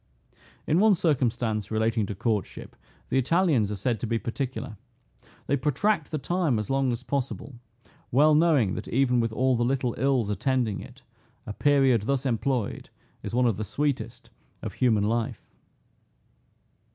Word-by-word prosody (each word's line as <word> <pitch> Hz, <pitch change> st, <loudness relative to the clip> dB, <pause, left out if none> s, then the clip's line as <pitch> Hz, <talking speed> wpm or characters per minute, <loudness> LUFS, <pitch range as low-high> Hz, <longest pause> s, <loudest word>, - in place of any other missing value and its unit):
In 160 Hz, -, +2 dB
one 215 Hz, 0 st, +5 dB
circumstance 120 Hz, -, 0 dB
relating 110 Hz, -1 st, 0 dB
to 105 Hz, -, -5 dB
courtship, 105 Hz, 0 st, -3 dB, 0.3 s
the 130 Hz, -, +2 dB
Italians 140 Hz, -, +2 dB
are -, -, -2 dB
said 110 Hz, +3 st, -1 dB
to 120 Hz, -, -3 dB
be 115 Hz, +1 st, 0 dB
particular. 125 Hz, 0 st, -4 dB, 0.7 s
They 140 Hz, -, +1 dB
protract 150 Hz, -, 0 dB
the 155 Hz, -, -2 dB
time 165 Hz, -4 st, 0 dB
as 105 Hz, +4 st, -3 dB
long 135 Hz, -1 st, +1 dB
as 120 Hz, +1 st, -4 dB
possible, 135 Hz, 0 st, -3 dB, 0.6 s
well 150 Hz, +5 st, +5 dB
knowing 150 Hz, -, +3 dB
that -, -, -5 dB
even 125 Hz, -1 st, +2 dB
with 115 Hz, -1 st, 0 dB
all 130 Hz, +3 st, +1 dB
the 120 Hz, -, +1 dB
little 125 Hz, -1 st, 0 dB
ills 130 Hz, -4 st, +1 dB
attending 115 Hz, 0 st, 0 dB
it, -, -, -12 dB, 0.4 s
a 105 Hz, -, -5 dB
period 135 Hz, -3 st, +3 dB
thus 135 Hz, +5 st, -1 dB
employed 125 Hz, -2 st, -1 dB, 0.3 s
is -, -, -5 dB
one 125 Hz, 0 st, +3 dB
of 115 Hz, -5 st, +1 dB
the 110 Hz, -, -3 dB
sweetest 145 Hz, +6 st, -3 dB, 0.3 s
of -, -, -5 dB
human 110 Hz, -5 st, +2 dB
life. 115 Hz, +2 st, -2 dB
125 Hz, 155 wpm, -26 LUFS, 110-140 Hz, 0.7 s, one